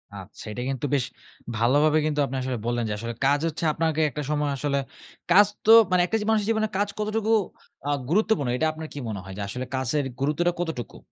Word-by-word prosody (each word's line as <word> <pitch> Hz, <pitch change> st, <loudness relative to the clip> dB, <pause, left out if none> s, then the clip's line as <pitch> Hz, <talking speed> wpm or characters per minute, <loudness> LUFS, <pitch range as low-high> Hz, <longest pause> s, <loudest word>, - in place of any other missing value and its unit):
আচ্ছা 95 Hz, -2 st, -10 dB
এটা 125 Hz, -, -5 dB
কিন্তু 135 Hz, +1 st, -2 dB
বেশ 130 Hz, -3 st, +1 dB, 0.5 s
ভালোভাবে 145 Hz, +7 st, +3 dB
কিন্তু 150 Hz, -1 st, -1 dB
আপনি 135 Hz, -, -5 dB
আসলে 130 Hz, -1 st, -2 dB
বললেন, 120 Hz, 0 st, 0 dB
যে -, -, -1 dB
আসলে 115 Hz, +2 st, -5 dB
কাজ 140 Hz, +1 st, +4 dB
হচ্ছে 165 Hz, +1 st, -4 dB
আপনাকে 160 Hz, -1 st, 0 dB
একটা 150 Hz, -, -5 dB
সময় 150 Hz, -1 st, 0 dB
আসলে 140 Hz, +1 st, -1 dB, 0.5 s
কাজ 205 Hz, +3 st, +8 dB, 0.2 s
তো 220 Hz, -, +6 dB, 0.2 s
মানে 180 Hz, -1 st, +4 dB
একটা 225 Hz, -, 0 dB
জি -, -, -3 dB
মানুষের 215 Hz, -2 st, +2 dB
জীবনে 220 Hz, -1 st, +1 dB
কাজ 205 Hz, +1 st, +1 dB
কতটুকু 215 Hz, +1 st, -1 dB, 0.6 s
আ -, -, 0 dB, 0.2 s
গুরুত্বপূর্ণ, 195 Hz, -, +2 dB
এটা 160 Hz, +4 st, +2 dB
আপনার 155 Hz, 0 st, -7 dB
কি -, -, -9 dB
মনে 100 Hz, -3 st, -4 dB
হয়? 95 Hz, 0 st, -9 dB
যে -, -, -4 dB
আসলে 125 Hz, +6 st, -4 dB
কাচের 130 Hz, +2 st, 0 dB
গুরুত্বটা 155 Hz, +5 st, +1 dB
কতটুকু? 160 Hz, -, -4 dB
150 Hz, 205 wpm, -25 LUFS, 125-175 Hz, 0.6 s, কাজ